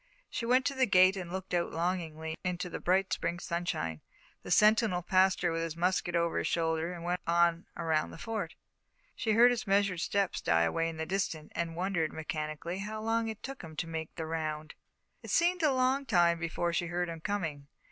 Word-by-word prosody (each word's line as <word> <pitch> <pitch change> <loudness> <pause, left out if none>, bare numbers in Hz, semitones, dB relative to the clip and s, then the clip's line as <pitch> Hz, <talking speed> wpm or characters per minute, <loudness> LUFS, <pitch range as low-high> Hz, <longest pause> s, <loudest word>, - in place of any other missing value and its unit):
She 230 - -3
went 255 +2 +4
to 280 - +1
the 260 -1 +2
gate 185 -1 +6
and 180 -3 -6
looked 190 0 -5
out 175 -1 +1
longingly 160 -2 -2
into 180 -1 -3
the - - -4
bright 190 +2 +2
Spring 175 - -1
sunshine. 170 - -3 0.4
The - - -9
sentinel 215 -4 +4
passed 185 +1 +3
her 175 - +2
with 165 0 -1
his 165 -1 -4
musket 175 0 0
over 170 0 +1
his - - -1
shoulder, 165 0 0
and 175 -2 -7
went 175 +1 -1
on 170 0 +2
around 160 -2 0
the - - -10
Fort. 225 +4 -4 0.6
She 220 - 0
heard 240 +3 +7
his 235 -3 -2
measured 195 -2 +2
steps 200 +2 0
die 85 0 +3
away 165 - 0
in 165 - -7
the 160 - -2
distance, 165 -4 -2
and 165 -1 -3
wondered, 175 -3 0
mechanically, 155 +3 -4
how 215 +2 -4
long 225 +1 0
it 220 -1 -6
took 270 0 -6
him 160 -2 -10
to 165 - -2
make 160 -1 -5
the 160 - -4
round. 155 -1 -3 0.5
It - - -10
seemed 355 +2 +3
a 305 -3 +4
long 260 +1 +1
time 175 -5 +4
before 170 +1 -1
she 175 0 0
heard 175 +1 -1
him 165 -1 -6
coming. 160 -8 -3
175 Hz, 210 wpm, -31 LUFS, 165-200 Hz, 0.6 s, heard